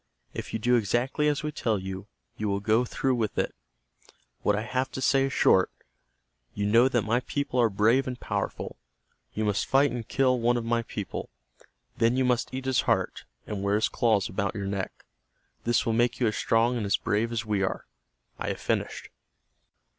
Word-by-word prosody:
If -, -, -6 dB
you -, -, -1 dB
do 120 Hz, +3 st, +3 dB
exactly 120 Hz, +7 st, +1 dB
as 150 Hz, +1 st, 0 dB
we 150 Hz, -, -2 dB
tell 115 Hz, -6 st, 0 dB
you, 95 Hz, +1 st, -6 dB, 0.3 s
you 105 Hz, -1 st, -2 dB
will 100 Hz, 0 st, 0 dB
go 110 Hz, +4 st, +2 dB
through 130 Hz, +2 st, 0 dB
with 115 Hz, -4 st, -1 dB
it. -, -, 0 dB, 0.9 s
What 105 Hz, -, +2 dB
I 105 Hz, -, -2 dB
have 130 Hz, +2 st, -1 dB
to -, -, -4 dB
say 135 Hz, +1 st, +3 dB
is 135 Hz, -, -2 dB
short. 95 Hz, -, +4 dB, 0.9 s
You 100 Hz, -, -1 dB
know 115 Hz, +5 st, +5 dB
that 120 Hz, -4 st, +1 dB
my 115 Hz, +2 st, +1 dB
people 140 Hz, -1 st, -1 dB
are 115 Hz, -, +4 dB
brave 115 Hz, +7 st, +3 dB
and 125 Hz, -1 st, -4 dB
powerful. -, -, -3 dB, 0.6 s
You 110 Hz, -, 0 dB
must 105 Hz, -1 st, 0 dB
fight 140 Hz, +2 st, +4 dB
and 120 Hz, -2 st, -5 dB
kill 130 Hz, -2 st, +2 dB
one 120 Hz, +1 st, +2 dB
of 115 Hz, -, -3 dB
my 115 Hz, 0 st, +1 dB
people. 105 Hz, -4 st, -5 dB, 0.7 s
Then 115 Hz, +2 st, +3 dB
you 130 Hz, -, +2 dB
must 125 Hz, -2 st, +1 dB
eat 130 Hz, 0 st, -5 dB
his 130 Hz, -1 st, +2 dB
heart, -, -, 0 dB, 0.2 s
and 105 Hz, -2 st, -4 dB
wear 100 Hz, +1 st, +1 dB
his 110 Hz, -, +2 dB
claws 110 Hz, -5 st, +2 dB
about 100 Hz, +3 st, -2 dB
your 100 Hz, -2 st, -3 dB
neck. 95 Hz, -1 st, -4 dB, 0.6 s
This 120 Hz, 0 st, +2 dB
will 115 Hz, -, +1 dB
make 120 Hz, +2 st, +1 dB
you 125 Hz, -, +2 dB
as 110 Hz, -, +1 dB
strong 115 Hz, +2 st, +2 dB
and 110 Hz, -, -2 dB
as 100 Hz, -, +3 dB
brave 110 Hz, +3 st, 0 dB
as 115 Hz, -2 st, -2 dB
we 105 Hz, -2 st, 0 dB
are. 95 Hz, -, -2 dB, 0.5 s
I -, -, -3 dB
have -, -, -2 dB
finished." -, -, -2 dB
115 Hz, 200 wpm, -27 LUFS, 105-125 Hz, 0.9 s, know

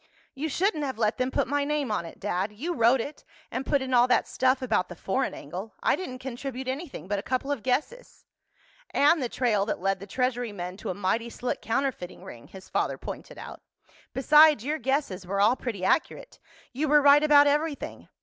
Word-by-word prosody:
"You 300 Hz, +3 st, -3 dB
shouldn't 335 Hz, 0 st, 0 dB
have 265 Hz, -5 st, -3 dB
let 215 Hz, -1 st, 0 dB
them 255 Hz, 0 st, +1 dB
put -, -, 0 dB
my 285 Hz, +1 st, 0 dB
name 290 Hz, -4 st, -1 dB
on 190 Hz, -5 st, -1 dB
it, -, -, -13 dB
Dad. 195 Hz, 0 st, -2 dB
You 295 Hz, +12 st, -4 dB
wrote 240 Hz, -2 st, +4 dB
it, 290 Hz, +6 st, -8 dB, 0.3 s
and 260 Hz, +1 st, -4 dB
put 280 Hz, -2 st, +2 dB
in 260 Hz, -1 st, -4 dB
all 245 Hz, 0 st, +5 dB
that 250 Hz, -, +2 dB
stuff 260 Hz, +1 st, +1 dB
about 215 Hz, -7 st, 0 dB
the 175 Hz, -, -8 dB
foreign 255 Hz, +10 st, -2 dB
angle. 185 Hz, +9 st, -8 dB
I -, -, +3 dB
didn't 310 Hz, -9 st, -6 dB
contribute 260 Hz, 0 st, -6 dB
anything 265 Hz, -, -5 dB
but 205 Hz, 0 st, -1 dB
a -, -, -4 dB
couple 260 Hz, +5 st, -2 dB
of 285 Hz, -6 st, -2 dB
guesses." 305 Hz, -, -3 dB, 0.6 s
"And 295 Hz, +2 st, +3 dB
the 245 Hz, -, -2 dB
trail 225 Hz, -6 st, +1 dB
that -, -, -2 dB
led 195 Hz, +1 st, 0 dB
the 200 Hz, -, -9 dB
Treasury 245 Hz, 0 st, -1 dB
men 180 Hz, -2 st, -6 dB
to -, -, -6 dB
a 185 Hz, -, -2 dB
mighty 210 Hz, +4 st, -1 dB
slick 245 Hz, +1 st, -4 dB
counterfeiting 235 Hz, -6 st, -2 dB
ring," 120 Hz, -1 st, -11 dB
his 190 Hz, -1 st, -12 dB
father -, -, -1 dB
pointed -, -, -8 dB
out. -, -, -9 dB, 0.5 s
"Besides, 300 Hz, -2 st, +5 dB
your 305 Hz, +2 st, -1 dB
guesses 255 Hz, -8 st, -1 dB
were 195 Hz, +1 st, -1 dB
all 215 Hz, +5 st, +5 dB
pretty 220 Hz, -8 st, -4 dB
accurate. 315 Hz, -, -1 dB, 0.3 s
You 295 Hz, +5 st, -1 dB
were 295 Hz, +1 st, +6 dB
right 285 Hz, +1 st, +7 dB
about 295 Hz, -1 st, +6 dB
everything. 295 Hz, +1 st, -1 dB
255 Hz, 205 wpm, -27 LUFS, 210-285 Hz, 0.6 s, right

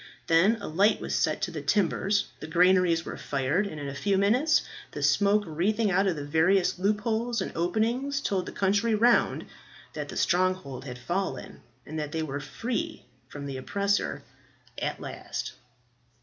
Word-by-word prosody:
Then 190 Hz, +8 st, +4 dB
a 205 Hz, -, -6 dB
light 200 Hz, +7 st, +3 dB
was -, -, -4 dB
set 155 Hz, +3 st, 0 dB
to 185 Hz, -, -1 dB
the 155 Hz, -3 st, -5 dB
timbers, 200 Hz, +4 st, +1 dB
the -, -, -7 dB
granaries 175 Hz, 0 st, +3 dB
were -, -, -6 dB
fired, 145 Hz, +9 st, 0 dB
and 155 Hz, -6 st, -7 dB
in 145 Hz, -, -5 dB
a 140 Hz, -, -4 dB
few 195 Hz, +7 st, 0 dB
minutes 250 Hz, +11 st, +3 dB, 0.3 s
the -, -, -4 dB
smoke 205 Hz, +1 st, +3 dB
wreathing 195 Hz, +7 st, 0 dB
out 195 Hz, +2 st, +3 dB
of 180 Hz, -, +1 dB
the 145 Hz, -1 st, -5 dB
various 175 Hz, +5 st, +2 dB
loopholes 220 Hz, +4 st, 0 dB
and -, -, -3 dB
openings 230 Hz, +10 st, 0 dB
told 195 Hz, -9 st, -1 dB
the -, -, -5 dB
country 205 Hz, +3 st, +1 dB
round 235 Hz, +3 st, +3 dB, 0.5 s
that -, -, -5 dB
the -, -, -6 dB
stronghold 180 Hz, -8 st, 0 dB
had 125 Hz, -2 st, -6 dB
fallen, 170 Hz, 0 st, -4 dB, 0.2 s
and 155 Hz, +1 st, -5 dB
that 150 Hz, -1 st, -4 dB
they 160 Hz, -1 st, -1 dB
were 145 Hz, -2 st, -4 dB
free 205 Hz, -, -4 dB, 0.2 s
from 140 Hz, +1 st, -8 dB
the 135 Hz, -2 st, -5 dB
oppressor 200 Hz, +9 st, -1 dB, 0.6 s
at -, -, -2 dB
last. -, -, -6 dB
185 Hz, 170 wpm, -27 LUFS, 155-210 Hz, 0.6 s, Then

